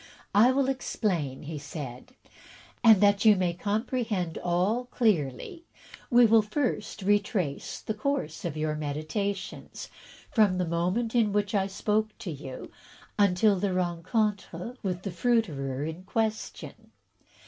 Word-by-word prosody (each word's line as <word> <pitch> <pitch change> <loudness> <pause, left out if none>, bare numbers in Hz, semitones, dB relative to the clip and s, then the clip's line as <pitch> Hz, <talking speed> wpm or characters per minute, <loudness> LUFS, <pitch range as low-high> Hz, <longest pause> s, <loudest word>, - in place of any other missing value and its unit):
"I 225 +5 +6
will 270 0 +1
explain," 185 - -2
he 150 0 -5
said, 145 - -8 0.7
"and, 220 -4 +8
that 205 -1 +4
you 215 -2 +7
may 180 -2 0
comprehend 205 -2 -2
all 185 +8 0
clearly, 215 - -1 0.4
we 245 -1 +6
will 225 0 +6
first 215 -2 -2
retrace 200 -6 0
the 220 - -3
course 215 - -2
of 160 -3 -3
your 155 0 -1
meditations, 155 +7 -4 0.4
from 205 -5 +3
the 180 - 0
moment 180 +8 -1
in 225 -4 +3
which 205 0 0
I 195 -2 +2
spoke 215 +2 -1
to 180 - -6
you 135 -3 -8 0.5
until 200 0 +4
that 200 - +1
of 185 - -1
the - - +2
rencontre 185 +3 -2
with 185 -3 -3
the 195 - -3
fruiterer 165 - 0
in 160 +3 -5
question. 220 +3 -3
200 Hz, 135 wpm, -28 LUFS, 170-220 Hz, 0.7 s, and